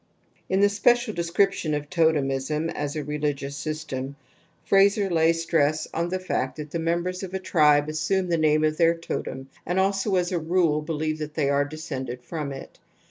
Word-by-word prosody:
In 190 +1 +2
the 205 - +6
special 240 +3 +2
description 170 -2 +1
of 145 0 -4
totemism 155 -2 +1
as 145 0 -4
a 155 - -2
religious 145 -1 -3
system, 140 -3 -4 0.5
Frazer 200 0 +4
lays 165 0 +2
stress 155 -2 +1
on 170 +1 -1
the 185 - -1
fact 185 -8 -2
that 150 -1 -7
the 170 - -2
members 175 +2 -1
of 190 -1 -6
a - - -1
tribe 150 -5 +3
assume 180 +5 0
the 170 - +1
name' 155 0 +3
of 155 0 +1
their 170 -1 +4
totem 135 -5 -5
and 180 +2 -1
also 195 +1 +1
as 180 0 +1
^ - - -2
"^ulr 175 - +1
hpH^i^P 165 -4 +2
f^i 155 -1 -3
i}u>y 140 - +2
are 140 0 +2
descended 135 -5 -6
from 150 -1 -4
it. 135 - -9
155 Hz, 185 wpm, -25 LUFS, 150-180 Hz, 0.5 s, the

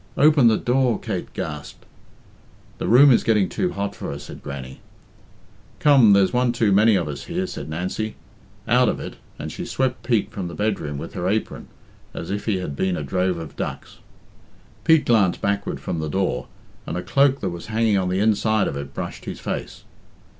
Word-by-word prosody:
Open 145 -4 +6
the 110 -2 +4
door!" 125 -2 +1
Kate 100 -6 -4
gasped. 75 -2 -6 0.9
"The - - -2
room 135 +4 +7
is 120 - +4
getting 105 -4 +3
too 180 - -2
hot 100 0 -3
for - - -6
her," 70 - -5
said - - -10
Grannie. 70 -2 -7 1.0
"Come, 135 -8 +6
there's 100 +1 +4
one 125 -1 +2
too 115 -3 +2
many 105 +2 +5
of 90 -5 0
us 70 -2 -6
here," 180 +2 -2
said 185 - -7
Nancy. 95 +7 -3 0.5
"Out - - +4
of - - -2
it," - - -7 0.2
and - - -6
she - - -6
swept 130 -1 -1
Pete 115 -5 0
from 95 -3 -4
the 85 - -7
bedroom 100 -9 -2
with 80 +4 -7
her 90 0 -2
apron 110 +2 -2 0.5
as 85 - -5
if 100 +1 -3
he 105 -4 +1
had 90 -6 -4
been 95 +3 0
a 75 - -3
drove 90 +3 0
of 80 -2 -8
ducks. - - -6 0.9
Pete 160 -2 +5
glanced 105 -6 +3
backward 100 0 -1
from 85 - -4
the 80 -1 -3
door, 80 -8 -1 0.4
and 85 - -3
a 90 - -4
cloak 140 0 +3
that 95 - -1
was 85 -1 -7
hanging 110 -1 +1
on 90 -1 -1
the 95 +1 0
inside 110 0 +2
of - - -3
it 70 -1 -7
brushed - - -6
his - - -6
face. - - -5
100 Hz, 195 wpm, -23 LUFS, 85-115 Hz, 1.0 s, room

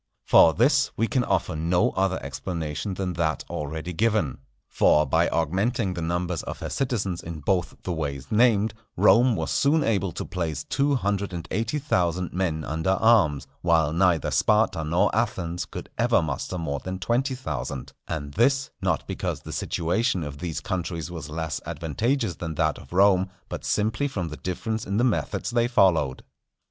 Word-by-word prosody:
For 80 - +6
this 135 +3 +3
we 115 - +2
can 125 +1 +1
offer 80 - 0
no 85 +3 +2
other 95 0 0
explanation 80 +5 -4
than 90 -1 -2
that 80 -4 0
already 80 +4 -4
given. 105 - +1 0.3
For 75 0 +4
by 65 - +2
augmenting 95 - 0
the 85 - -5
numbers 85 +1 -1
of - - -6
her - - -4
citizens 105 -9 -1
in 80 -2 -7
both 90 +3 0
the 90 - -2
ways 70 -4 -4
named, 110 -1 +3 0.2
Rome 120 0 +5
was - - -2
soon 145 +3 +3
able 100 -6 0
to - - -4
place 80 -5 -3
two 140 0 +1
hundred 100 -5 -1
and 85 -1 -5
eighty 115 +8 -1
thousand 90 - 0
men 85 -4 -1
under 80 +4 -2
arms; 85 - +4 0.2
while 80 -3 +3
neither 85 -3 +2
Sparta 105 -6 +2
nor 85 +6 +1
Athens 90 -7 -1
could - - -8
ever 115 -5 +3
muster 80 +4 -3
more 70 -4 -2
than 95 +4 -5
twenty 120 +8 0
thousand; 70 - -5
and 75 -3 -4
this, 135 - +2
not - - 0
because - - -3
the - - -8
situation 90 +3 0
of 70 -1 -7
these 85 -3 -4
countries 85 -2 -3
was 85 -3 -7
less 80 -1 -3
advantageous 85 - -1
than 80 -2 -5
that - - +1
of - - -15
Rome, 95 0 +4 0.2
but - - -5
simply 110 +7 0
from 95 -11 -3
the 75 - -7
difference 110 +4 -3
in 100 +1 -1
the 120 - +3
methods 100 - 0
they 120 0 +2
followed. 85 - +2
90 Hz, 175 wpm, -25 LUFS, 80-110 Hz, 0.3 s, For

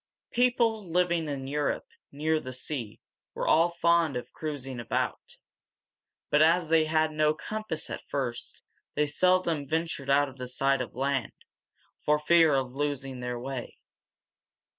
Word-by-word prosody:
People 235 -3 +2
living 170 -2 +1
in 135 -2 -4
Europe, 145 +1 -1 0.3
near 155 +2 0
the 130 -3 -7
sea, 125 -4 -5 0.4
were - - -2
all 165 +2 +5
fond 170 -4 +2
of 125 - -7
cruising 135 -5 -5
about; 120 - -3 0.9
but 150 - +5
as 165 +1 +4
they 160 -1 +4
had 155 0 +2
no 155 0 +2
compass 185 +2 -3
at - - -6
first, 125 -4 -4 0.3
they 150 - +3
seldom 170 0 +2
ventured 160 -3 -2
out 145 +1 +4
of 130 -2 -8
sight 135 +1 +1
of 125 - -6
land, 135 -2 -1 0.7
for 150 0 +3
fear 160 0 +5
of 130 -2 -1
losing 135 -2 -3
their 125 0 -3
way. 130 0 -6
150 Hz, 140 wpm, -28 LUFS, 135-165 Hz, 0.9 s, all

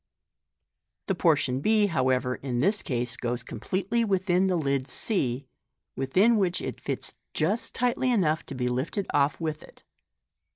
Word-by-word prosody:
The 195 - 0
portion 150 -7 +2
6, 215 -3 +3
however, 130 -3 +1
in 125 -2 -4
this 200 - +2
case 120 -2 -1
goes 120 0 -3
completely 200 +5 -1
within 190 -2 +2
the 185 - +1
lid 140 -4 0
c, 135 - -2 0.5
within 190 - +3
which 185 -3 +1
it - - -5
fits - - -4 0.2
just 220 +3 0
tightly 250 +1 +1
enough 170 -10 +2
to 140 - -6
be 125 -1 -1
lifted 130 +11 -1
off 140 0 +2
with 155 -2 -3
it. - - -17
160 Hz, 150 wpm, -27 LUFS, 130-200 Hz, 0.5 s, 6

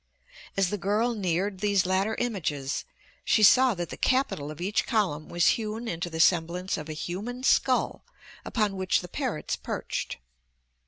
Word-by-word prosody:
As 195 -2 +2
the 205 - -2
girl 215 +6 +1
neared 190 -1 -1
these 200 -2 +2
latter 190 +4 +1
images 155 - -2 0.4
she 215 - +3
saw 250 +3 +6
that 175 -1 -4
the - - -6
capital 255 - +1
of 155 +1 -8
each 195 +4 0
column 190 - 0
was 175 0 +3
hewn 225 +1 -2
into 175 -2 -3
the 160 -1 -6
semblance 175 +2 +2
of 155 0 -7
a - - -3
human 205 +11 -5
skull 260 -1 +2 0.4
upon 210 -4 -1
which 185 0 +1
the 180 - -8
parrots 245 - -3
perched. - - -4
195 Hz, 160 wpm, -27 LUFS, 175-220 Hz, 0.4 s, saw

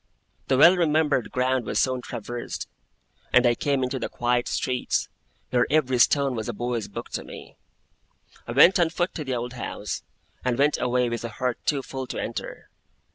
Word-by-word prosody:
The 130 - +2
well 170 +6 +8
remembered 155 -6 +2
ground 130 -1 0
was - - -2
soon 130 -1 +1
traversed, 120 +1 -6 0.6
and 125 0 +5
I 120 - +5
came 140 +2 0
into 130 +1 -2
the - - -3
quiet 120 0 0
streets, 125 -1 -1 0.4
where 125 -1 +3
every 130 -4 +2
stone 140 +1 +4
was 110 -3 -4
a - - -2
boy's 120 -1 -3
book - - -7
to - - -4
me. - - -11 0.9
I - - -4
went 170 +8 +7
on 170 -2 +3
foot 175 +2 -1
to 155 - -4
the 130 -2 -2
old 120 +1 -4
house, 125 - -5 0.4
and 125 -2 0
went 145 +2 +2
away 125 0 +1
with 120 0 -3
a 115 - -3
heart 125 +2 -2
too 140 -3 +1
full 130 -1 -6
to - - -5
enter. - - -6
130 Hz, 185 wpm, -25 LUFS, 120-140 Hz, 0.9 s, well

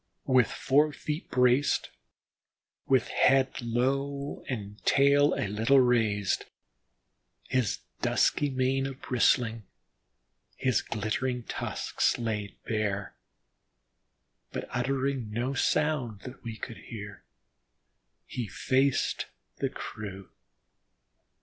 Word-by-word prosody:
With 130 -3 +4
fore 150 +3 +3
feet 150 +2 -5
braced, 125 +2 +3 1.0
with 130 -3 +3
head 135 0 +3
low 135 +4 -1
and 105 -4 -5
tail 140 +1 +4
a - - -1
little 110 +7 +4
raised, 110 -6 +2 1.0
his 125 -6 0 0.2
dusky 145 - +2
mane 135 +1 +1
a 135 - -5
bristling, 120 -3 +2 0.9
his 130 -3 +1
glittering 120 +3 -2
tusks - - -1
laid 105 -4 -3
bare, 105 -3 -2 1.4
but - - -4
uttering 130 -1 -1
no 120 +5 -1
sound 135 -7 0
that 130 +1 -10
we 115 -2 -6
could 115 -1 -7
hear, 105 -3 -9 1.0
he 120 -3 -4
faced 135 +6 +1 0.3
the - - 0
crew. 100 -3 -7
125 Hz, 95 wpm, -29 LUFS, 110-135 Hz, 1.4 s, With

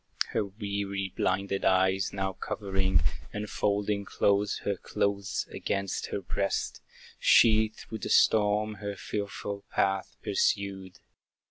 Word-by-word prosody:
Her - - 0
weary, 100 -2 -3
blinded 95 +1 0
eyes 95 +1 +3
now 95 -1 -2
covering, 95 -4 0 0.3
And 105 +1 -4
folding 100 0 0
close 100 +1 +1
her 100 - +1
clothes 100 0 -1
against 100 -1 -2
her 100 - -3
breast, 100 +2 -2 0.4
She 110 -1 +6
through 110 +1 -9
the - - -4
storm 105 0 +3
her 100 -1 -3
fearful 100 0 -4
path 95 0 0
pursued. 95 -2 0
100 Hz, 115 wpm, -29 LUFS, 95-105 Hz, 0.4 s, She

